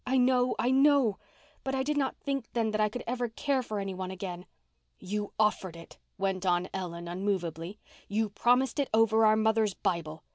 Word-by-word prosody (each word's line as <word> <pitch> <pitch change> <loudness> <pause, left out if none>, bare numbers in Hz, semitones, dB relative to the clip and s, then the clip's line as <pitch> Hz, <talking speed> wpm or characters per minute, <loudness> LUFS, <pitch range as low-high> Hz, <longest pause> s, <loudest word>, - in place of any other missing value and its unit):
"I 260 +1 +1
know—I 250 0 +3
know. 270 -5 +4 0.4
But 270 0 -2
I 265 - 0
did 300 +2 -1
not 275 -2 0
think 275 -4 -3
then 225 -2 +1
that 215 0 0
I 210 - +3
could 245 +3 -6
ever 245 0 -2
care 270 +4 0
for 215 -4 -4
anyone 190 -2 -4
again." 180 -1 -6 0.5
"You 205 +2 -4
offered 210 -5 +1
it," 165 0 -13 0.2
went 190 -1 -1
on 180 0 +1
Ellen 175 -2 -5
unmovably. 175 -1 -3 0.3
"You 215 +1 0
promised 245 +5 +2
it 280 - 0
over 220 0 +5
our 215 - +5
mother's 220 -2 +2
Bible. 160 -3 -2
215 Hz, 180 wpm, -29 LUFS, 185-250 Hz, 0.5 s, over